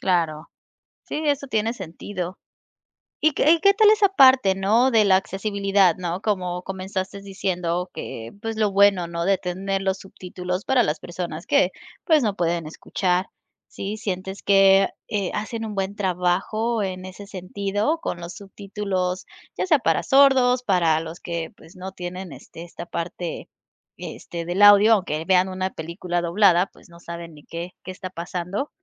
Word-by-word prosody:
Claro. 165 -4 0 0.6
Sí, 305 - -4
eso 285 -1 +1
tiene 220 0 0
sentido. 185 -1 -6 0.8
Y 310 - +3
que 295 - +2
y 335 - +5
que 395 +2 +5
tal 430 0 +5
esa 420 -2 +4
parte, 260 - +6
¿no? 220 +7 +3
De 220 -2 +4
la 190 - +5
accesibilidad, 195 -1 +1
¿no? 180 0 -3
Como 180 -4 -1
comenzaste 190 +1 -5
diciendo 180 -2 -2
que, 115 0 -7
pues 225 -1 -3
lo 210 -2 +2
bueno, 195 -3 +4
¿no? 170 0 -3
De 195 0 +3
tener 195 +2 -3
los 190 0 0
subtítulos 180 0 -6
para 260 -3 +3
las 150 -3 -1
personas 170 -2 -6
que 185 - +3 0.3
pues 315 -3 +4
no 205 -3 0
pueden 170 -1 -1
escuchar, 180 +3 -1 0.4
¿sí, 205 +2 -5
sientes 190 -1 -5
que, 195 0 +5 0.2
eh, 200 -4 -2
hacen 225 +2 -4
un 215 - -5
buen 195 +1 -2
trabajo 195 +4 0
en 185 -1 -4
ese 185 +2 -9
sentido 200 - -2
con 175 - -4
los 170 +1 -7
subtítulos 195 -2 -4 0.3
ya - - 0
sea 305 -6 +4
para 165 -5 +1
sordos? 260 +1 +5
Para 170 -7 +2
los 165 +2 -8
que 170 -2 -4
pues, 165 - -17
no 185 +1 -7
tienen 180 -1 -7
este 150 +5 -11
esta 170 0 -9
parte 170 0 -5 0.5
este 170 -1 -7
del 180 +4 -2
audio 205 +2 +8
aunque 170 -6 0
vean 185 +1 +3
una 185 0 -2
película 175 +2 -4
doblada, 180 +1 +4
pues, - - -19
no 170 0 -15
saben 170 -1 -8
ni 150 - -15
qué, 170 +2 -6
qué - - -9
está 185 0 -7
pasando. 180 - -4
190 Hz, 165 wpm, -23 LUFS, 175-205 Hz, 0.8 s, audio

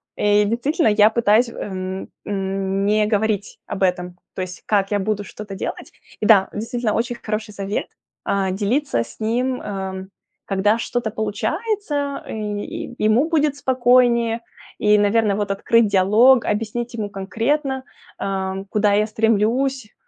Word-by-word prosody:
И 205 0 +3
действительно, 255 - +1
я 210 0 +5
пытаюсь, 230 +1 +3
эм, 190 -3 -5 0.2
м, 195 0 -2
не 210 +1 +3
говорить 210 -1 -1
об 195 - -3
этом. 180 -1 0 0.2
То - - -3
есть, 185 0 -7
как 200 -2 +1
я 205 - +2
буду 205 +1 -1
что-то 205 0 -8
делать. - - -5 0.3
И - - 0
да, 205 -3 +6
действительно, 225 +1 -2
очень 240 +1 -1
хороший 215 -1 -4
совет- 200 +1 -3 0.4
а, 195 -1 0
делиться 210 - 0
с - - -15
ним, 245 +4 -1
эм, 190 -1 -5 0.4
когда 205 +3 +2
что-то 235 -1 -2
получается, 285 - -2
э, - - -7
и 210 +1 -5
ему 230 +9 +3
будет 300 -3 +2
спокойнее. 245 -3 +3 0.4
И, 210 0 +4
наверное, 205 0 +2
вот 205 -1 -2
открыть 225 +3 +3
диалог, 215 +6 +5
объяснить 225 +3 -2
ему 215 -3 -3
конкретно, 260 +8 -1 0.3
ам, 190 0 -3
куда 205 +1 +1
я 210 +1 +2
стремлюсь, 225 +3 0
215 Hz, 145 wpm, -21 LUFS, 200-240 Hz, 0.4 s, да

